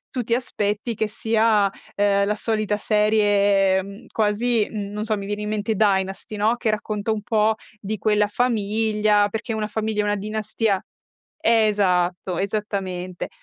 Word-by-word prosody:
tu 250 - -2
ti 230 0 0
aspetti 215 -2 -2
che 220 0 -1
sia, 220 -2 +2 0.3
ehm, 200 -1 +3
la 210 - +1
solita 215 -1 -1
serie 200 -2 +2
quasi, 220 +1 +1
non 210 0 -4
so, 215 -1 0
mi 200 - -6
viene 205 +1 -3
in 210 - -3
mente 215 +1 -1
"Dynasty", 195 0 0
no, 220 +3 +2
che 230 -2 0
racconta 215 0 -2
un 210 - -3
po' 220 -1 +2 0.2
di 215 0 -4
quella 210 -1 +2
famiglia, 215 -2 +1
perché 225 +3 -4
una 215 -1 -2
famiglia 215 0 -2
è - - -2
una 205 0 +1
dinastia 215 0 -1 0.6
esatto, 190 -5 +2
esattamente. 190 -3 -3
210 Hz, 145 wpm, -23 LUFS, 200-220 Hz, 0.6 s, ehm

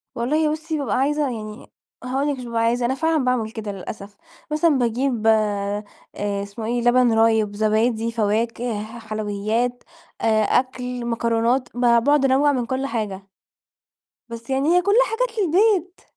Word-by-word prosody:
والله 300 +6 +1
بُصّي، 315 0 -3
بابقى 280 -3 -1
عايزة 295 +3 +1
يعني 215 -1 -8 0.3
هاقول 265 +3 -1
لِك 280 - -2
مش 250 - -7
بابقى 230 -1 -1
عايزة 240 +1 +1
أنا 260 +2 0
فعلًا 320 -3 +1
باعمل 235 -4 0
كده 220 -2 -5
للأسف 200 +1 -9 0.3
مثلًا 305 -1 +3
باجيب 240 -1 0
آآ 205 -1 +1 0.6
إسمه 200 +3 -7
إيه؟ 240 +2 -1
لبن 240 0 +4
رايب، 220 -2 +2
زبادي، 220 +2 +1
فواكه، 225 0 -1 0.2
حلويات، 215 +3 -2 0.4
آآ 220 -1 +3
أكل، 250 +1 -1
مكرونات 235 +2 0
ب - - -3
باقعد 250 +4 +4
أنوّع 275 +2 +3
من 250 -4 -1
كل 260 +3 -2
حاجة. 205 -6 -4 1.0
بس 230 +1 -9
يعني 270 +3 +1
هي - - +4
كلها 410 +7 +4
حاجات 465 -1 -2
للبيت. 370 0 +2
240 Hz, 150 wpm, -22 LUFS, 220-275 Hz, 1.0 s, لبن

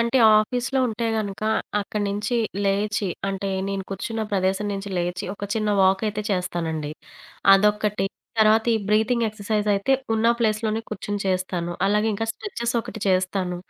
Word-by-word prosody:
అంటే, 235 +3 +2 0.2
ఆఫీసులో 245 +4 0
ఉంటే 225 +1 -3
గనక 205 -1 -4 0.4
అక్కడి 205 +1 -3
నుంచి 210 +4 -1 0.3
లేచి, 200 0 0 0.2
అంటే, 195 0 -3 0.2
నేను 195 -1 -3
కూర్చున్న 220 +4 -3
ప్రదేశం 190 +1 +1
నుంచి 200 0 -4
లేచి, 175 0 -2
ఒక 200 - -6
చిన్న 215 -1 0
వాక్ 190 +2 +3
అయితే 210 0 -2
చేస్తానండి. 165 -5 -2 0.6
అదొక్కటి, 210 0 +3 0.4
తర్వాత 220 +1 +5
ఈ - - +3
బ్రీతింగ్ 225 +3 +2
ఎక్సర్సైజ్ 210 0 -2
అయితే 200 +6 +1 0.2
ఉన్న 220 +1 +1
ప్లేస్‌లోనే 220 -1 0
కూర్చొని 205 -1 -4
చేస్తాను. 185 -2 -1
అలాగే 210 +2 +2
ఇంకా 225 +3 -2
స్ట్రెచెస్ 235 - -4
ఒకటి 235 -1 -8
చేస్తాను. 185 -1 +1
210 Hz, 145 wpm, -24 LUFS, 190-220 Hz, 0.6 s, తర్వాత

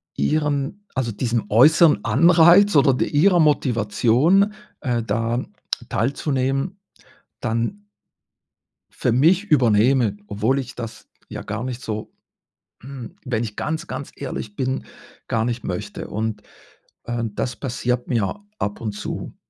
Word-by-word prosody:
ihren 150 - -1
also, 125 -4 -1
diesem 115 +1 -1
äußeren 150 +8 +5
Anreiz 175 +4 +6
oder 140 -2 +5
d - - 0
ihrer 175 +5 +4
Motivation, 140 - +3 0.3
äh, 120 -5 0
da 115 +3 -1 0.5
teilzunehmen, 135 - -1 0.6
dann 120 - -2 1.2
für 120 - +2
mich 170 - +4
übernehme, 120 - +3
obwohl 110 +7 0
ich 135 - -6
das 115 -2 -8 0.2
ja - - -6
gar 110 +3 -4
nicht 125 -1 -5
so, 110 -1 -5 0.7
hm 130 -2 -9
wenn 120 -2 -1
ich 105 -2 -7
ganz, 160 +1 -3
ganz 130 +2 -6
ehrlich 115 -6 -6
bin, 130 0 -2 0.4
gar 110 -1 0
nicht 120 0 -3
möchte 100 +3 -5
und, 110 -1 -3 0.6
äh, 120 0 -3
das 115 +2 -3
passiert 125 -1 -2
mir 120 - -1
ab 105 - -3
und 105 -3 -3
zu. 105 - -6
125 Hz, 125 wpm, -22 LUFS, 115-150 Hz, 1.2 s, Anreiz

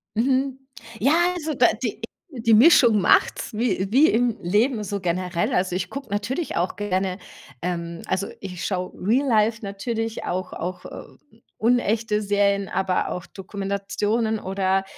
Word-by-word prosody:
Mhm. 265 +3 +1 0.4
Ja, 275 +7 +3 0.2
also 315 -3 -3
da - - +5 0.2
die - - -3 0.4
die 230 -1 +2
Mischung 235 -3 +7
macht's 185 - +2
wie 210 -4 0
wie 280 +7 +6
im 235 0 +1
Leben 215 +6 +1
so 200 0 -3
generell. 180 -1 -1
Also, 180 0 +1
ich 180 - -2
gucke 275 -3 -7
natürlich 210 +11 -2
auch 175 +2 -1
gerne, 190 -2 -1 0.4
ähm, 170 -1 -4
also 190 +1 -1
ich 180 -3 -6
schaue 185 -2 -2
Real 245 +9 +2
Life 220 -1 +2
natürlich 225 +3 -3
auch 185 +1 -3
auch, 180 +1 -5
ähm, - - -11 0.4
unechte 225 -2 +1
Serien, 200 -1 +1
aber 190 0 0
auch 180 - -5
Dokumentationen. 200 +3 -2
Oder 190 0 0
205 Hz, 145 wpm, -23 LUFS, 185-230 Hz, 0.4 s, Mischung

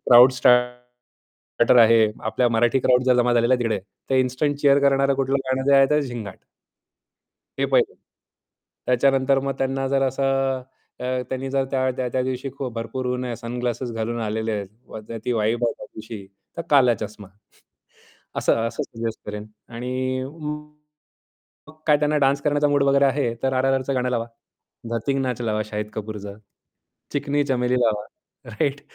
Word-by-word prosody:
Crowd 125 +2 +7
स्टा 125 - +4 1.1
starter 125 - +5
आहे, 115 -1 +5 0.2
आपल्या 120 +2 +1
मराठी 120 +3 +2
क्राउड 125 0 +3
जर 125 -1 +4
जमा 120 0 +3
झालेल्या 120 +1 +3
आहे 125 - -1
तिकडे 115 -2 0
आहे. 95 - -4 0.3
तर - - +2
इन्स्टंट 130 +3 +1
चीअर 140 -1 +5
करणारं 140 0 +3
कुठलं 135 0 0
गाणं 130 0 0
जे 140 - +6
आहे 135 0 +6
ते 150 0 +3
झिंगाट. 115 -7 -6 1.2
हे - - +1
पहिलं. - - +2 0.9
त्याच्यानंतर 135 +2 +3
मग 135 0 -2
त्यांना 135 0 -1
जर 135 0 +1
असं 135 0 0 0.4
अ, - - -5 0.2
त्यांनी 130 +1 -4
जर 135 0 +1
त्या 130 -1 -1
त्या 130 - 0
दिवशी 130 +1 -3
खूप 130 -3 -4
भरपूर 115 +3 -4
ऊन 125 0 -2
आहेत 120 -2 -4
सनग्लासेस 120 +1 -4
घालून 115 +1 -3
आलेले 110 +1 -2
आहेत, 105 +2 -8
ती 125 - 0
वाइब 115 +1 0
आहे 115 - +1
त्या - - -10
दिवशी, 110 -2 -9 0.3
तर 170 - -3
काला 125 -5 +5
चष्मा. 105 -2 -7 1.1
असं - - +2
असं 115 - -3
सजेस्ट 115 -1 -5
करेन 105 0 -6 0.3
आणि 130 +2 -2
म 150 +2 -5 1.1
मग 155 - -12
काय 150 - +5
त्यांना 150 +1 +1
डान्स 140 0 +2
करण्याचा 145 0 +2
मूड 145 -1 +2
वगैरे 140 0 +4
आहे, 135 -3 +1
तर 135 0 +1
आरआरआरचं 135 +1 +1
गाणं 125 0 0
लावा. 115 -2 -1 0.7
धतिंग 135 +4 -1
नाच 125 -2 -2
लावा 110 -1 0
शाहिद 105 0 -5
कपूरचं, 105 -1 -7 0.7
चिकनी 145 0 0
चमेली 125 -2 0
लावा. 105 -3 +1 0.5
राइट, 140 +6 -1
125 Hz, 165 wpm, -23 LUFS, 115-135 Hz, 1.2 s, क्राउड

